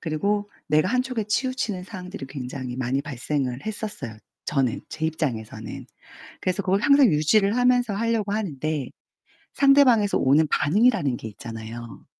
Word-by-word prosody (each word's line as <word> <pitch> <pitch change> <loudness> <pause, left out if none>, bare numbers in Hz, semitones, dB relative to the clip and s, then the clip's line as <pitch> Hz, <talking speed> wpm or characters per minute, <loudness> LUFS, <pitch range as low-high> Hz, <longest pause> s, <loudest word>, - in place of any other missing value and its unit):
그리고 200 +6 -1 0.2
내가 155 +4 +3
한쪽에 255 -3 0
치우치는 220 -3 -1
상황들이 185 -6 -8
굉장히 130 -2 -6
많이 130 +2 -1
발생을 135 - -3
했었어요. 205 - -5 0.3
저는 135 -5 0
제 160 - -3
입장에서는. 140 -9 -4 0.5
그래서 185 +2 -1
그걸 190 +1 +1
항상 280 +2 +6
유지를 195 +8 +3
하면서 245 -3 +3
하려고 220 -1 0
하는데 155 - -2 0.7
상대방에서 270 -7 +5
오는 145 +4 +4
반응이라는 180 - +2
게 110 - -7
있잖아요. 115 +2 -9
180 Hz, 355 characters per minute, -24 LUFS, 135-215 Hz, 0.7 s, 항상